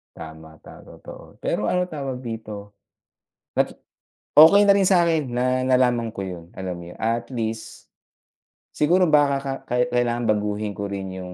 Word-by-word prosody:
Tama. 80 -1 -11
Ta - - -13
totoo. - - -13
Pero 105 - -1
ano 180 0 +1
tawag 135 -4 -5
dito, 110 -3 -7 0.9
natu - - +1 0.7
okey 180 +7 +8
na 205 - +5
rin 195 -2 +4
sa'kin 170 -6 +2
na 125 0 -1 0.2
nalaman 125 -2 +2
ko 95 - -4
'yun. 90 -3 -7
Alam 95 -1 -5
mo - - -9
'yun, 90 - -11
a 115 +1 -1
at 120 - -16
least, 110 -1 -5 0.8
siguro 175 +5 +3
baka 145 -3 +3
ka 135 0 -4 0.2
kahit 125 0 0
kailangan 120 -1 0
baguhin 105 -1 -1
ko 100 0 -5
rin 95 -1 -5
'yung 90 0 -8
120 Hz, 165 wpm, -23 LUFS, 100-140 Hz, 0.9 s, okey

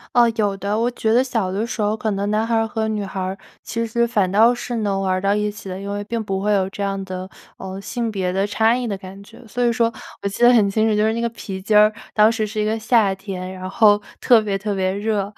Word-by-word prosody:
哦， 240 -1 +5
有 205 -2 +1
的， 200 +3 -2
我 235 +2 +2
觉 220 -2 0
得 245 - +5
小 225 -8 -1
的 210 +4 -2
时 225 - -4
候 210 +1 +1
可 220 -1 -2
能 200 +1 -1
男 220 +2 +1
孩 230 - +1
儿 225 0 +2
和 220 0 -2
女 215 -1 -2
孩 190 -1 -6
儿 185 +1 -3 0.3
其 230 0 -3
实 235 +1 +1
反 205 -6 +1
倒 225 +5 +5
是 240 0 -4
能 200 -3 -1
玩 190 -1 0
儿 185 - +1
到 200 +1 +1
一 210 0 0
起 205 - -11
的， 185 0 -5
因 200 +1 -6
为 205 0 -3
并 230 0 -3
不 195 -2 -2
会 210 +1 +1
有 190 -1 +1
这 205 - -8
样 195 -1 -2
的， 185 0 -6 0.3
呃， 190 0 -7
性 235 +3 -3
别 190 -4 -2
的 195 +2 0
差 220 +2 +2
异 250 -1 -3
的 200 -3 -3
感 190 +1 -11
觉， 230 +2 -15
所 240 +3 -4
以 235 - +2
说 230 0 +2 0.3
我 - - -2
记 200 - -7
得 240 +1 +7
很 210 -4 +4
清 220 +2 +2
楚， 215 - +2
就 210 - +2
是 220 - +2
那 230 - -2
个 235 - +1
皮 190 -4 -7
筋 210 +2 +3
儿 210 0 +6 0.2
当 215 +1 +5
时 220 -2 -1
是 215 0 -3
一 - - 0
个 220 +1 -1
夏 220 -3 +3
天， 190 -1 -6
然 185 0 -7
后 210 0 +4 0.2
特 240 -3 +5
别 205 -2 -1
特 205 +1 -3
别 190 -1 0
热， 205 0 -1
210 Hz, 310 characters per minute, -21 LUFS, 195-225 Hz, 0.3 s, 得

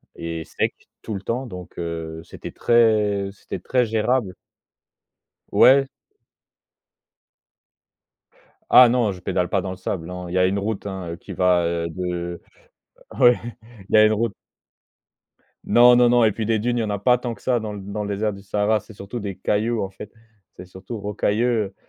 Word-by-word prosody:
et 85 -1 -5
sec, - - -2 0.3
tout 110 - -5
le 95 - -4
temps 120 +6 -3
donc 90 -5 -10
heu, 80 -1 -5
c'était - - -10
très 105 -4 +2
c'était 100 - -8
très 125 -2 +1
gérable. 110 -1 0 1.2
Ouais. 135 +1 +6 2.8
Ah 125 -1 +9
non 120 -3 +1
je 90 - -9
pédale 90 -1 -1
pas 100 - +1
dans 95 0 -5
le 95 - -7
sable, 95 -2 -4
non, 90 0 -7
il - - -7
y 95 - 0
a 90 - +4
une 100 +2 0
route 105 0 -3
hein 95 -3 -6
heu, 85 - -5
qui 100 - -10
va, 90 -1 +2
heu, 85 0 -1
de 85 0 -4 0.8
ouais 125 -2 +6 0.5
il - - +2
y - - +8
a 110 - +8
une 110 - +3
route 115 0 -1 1.3
Non, 120 +1 +6
non, 120 -1 +5
non 120 -1 +4
et 110 - +2
puis 110 0 -3
des 110 -1 +1
dunes, 120 +2 -1
il - - +1
y - - -1
en 110 - -3
a 100 -1 -2
pas 125 +3 +3
tant 120 -1 -4
que - - -15
ça 125 -2 0
dans 105 -1 -5
l 100 - -7
dans 105 +1 -4
le 105 - -5
désert 105 +1 -1
du 100 - -11
Sahara, 105 +2 0
c'est - - -16
surtout 100 +4 -7
des 100 -3 -5
cailloux 110 +2 0
en 95 - -3
fait, 100 +2 -11 0.5
c'est 90 - -9
surtout 95 +5 -9
rocailleux, 105 +3 0 0.2
heu, 95 - -19
105 Hz, 195 wpm, -22 LUFS, 90-115 Hz, 2.8 s, Ah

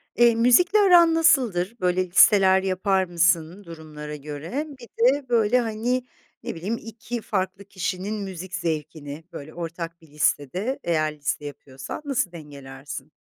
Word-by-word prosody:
Eee, 235 -1 +5
müzikle 300 - +4
aran 350 -4 +6
nasıldır? 240 - +2
Böyle, 185 0 +1
listeler 190 0 +5
yapar 190 0 +1
mısın 175 +1 +1
durumlara 155 -3 -9
göre? 150 - -5
Bir 240 - -12 0.3
de 280 -3 -6
böyle, 235 0 +3
hani, 240 +2 -1 0.4
ne - - -5
bileyim 195 +8 -3
2 230 +1 -7
farklı 190 -1 -3
kişinin 190 +1 -4
müzik 185 -1 -7
zevkini, 155 -3 -4
böyle, 155 -2 -9
ortak 170 0 -6
bir 160 - -18
listede, 150 - -1
eğer 155 -2 0
liste 145 0 -3
yapıyorsan, 135 - -8
nasıl 260 -10 -1
dengelersin? 140 -2 -10
185 Hz, 135 wpm, -24 LUFS, 155-225 Hz, 0.4 s, aran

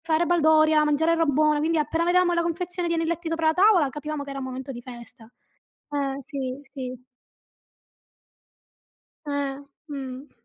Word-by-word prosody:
Fare 330 +1 +2
baldoria, 315 -2 +4
mangiare 300 +2 +2
roba 330 -3 +2
buona, 305 +1 +3
quindi 325 +2 +1
appena 325 +2 0
vedevamo 355 0 +3
la 340 - +2
confezione 350 +1 -2
di 335 - 0
anelletti 330 0 -2
sopra 330 0 -1
la 315 - +4
tavola, 365 -5 +5
capivamo 295 +1 -5
che 280 - -8
era 275 - -5
un 265 - -4
momento 260 +1 -6
di 240 -2 -8
festa. 240 -1 -12 0.6
Eh, 280 -2 -2
sì, 265 -1 -5
sì. 255 -3 -6 2.2
Eh, 285 -2 -2 0.3
mh. 270 -1 -7
300 Hz, 155 wpm, -25 LUFS, 270-330 Hz, 2.2 s, tavola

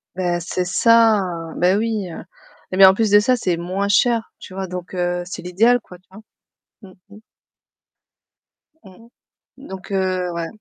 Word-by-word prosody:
Ben, 175 -2 -1
c'est 180 +1 -3
ça, 225 +2 +4 0.4
ben 185 +3 +2
oui. 220 -3 -2 0.6
Eh 185 - -3
beh 195 - +9
en 190 - +7
plus 220 -1 0
de 205 - +7
ça, 250 +5 +2
c'est 180 -7 -2
moins 185 +4 -3
cher, 230 +2 +1
tu 185 - -12
vois, 190 0 -5
donc 180 0 -8
heu, 175 0 -2
c'est 180 - -8
l'idéal 220 +8 +2
quoi, 180 - -15
tu 185 - -38
vois? 210 +3 -13 0.6
Mmh, 190 -2 -14 0.2
mmh. 215 - -15 1.6
Mmh. 195 +3 -17 0.5
Donc, 195 -9 -11
heu, 185 -2 -1
ouais. 170 -1 -4
190 Hz, 165 wpm, -20 LUFS, 180-220 Hz, 1.6 s, beh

